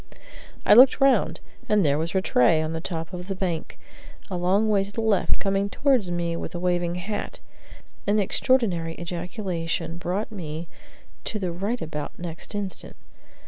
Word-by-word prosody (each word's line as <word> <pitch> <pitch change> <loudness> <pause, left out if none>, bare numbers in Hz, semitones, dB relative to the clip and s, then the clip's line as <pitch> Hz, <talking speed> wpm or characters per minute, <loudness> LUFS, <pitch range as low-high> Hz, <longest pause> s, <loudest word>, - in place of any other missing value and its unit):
I - - +7
looked 255 +5 +8
round, 275 -1 +3 0.3
and 210 -4 +4
there 145 0 +2
was 165 +4 -3
Rattray 160 -4 +4
on 155 +1 -2
the 160 - -3
top 165 0 -5
of 180 0 -6
the 195 - -3
bank, 175 -4 -3 0.5
a - - -1
long 185 +5 +2
way 205 -2 +3
to 200 - -9
the 215 - -5
left, 220 -3 +2
coming 195 0 0
towards 255 -6 +2
me 170 -1 -1
with 170 - -5
a - - -3
waving 175 -1 0
hat. 200 +4 -4 0.7
An 205 +1 +3
extraordinary 195 -6 +1
ejaculation 170 -2 -3
brought 185 +6 -2
me 165 -4 -6 0.6
to 215 - -2
the 185 -4 -2
right 200 +7 -2
about 150 -2 -5
next 170 +3 -6
instant. 200 -3 -5
180 Hz, 165 wpm, -25 LUFS, 170-205 Hz, 0.7 s, looked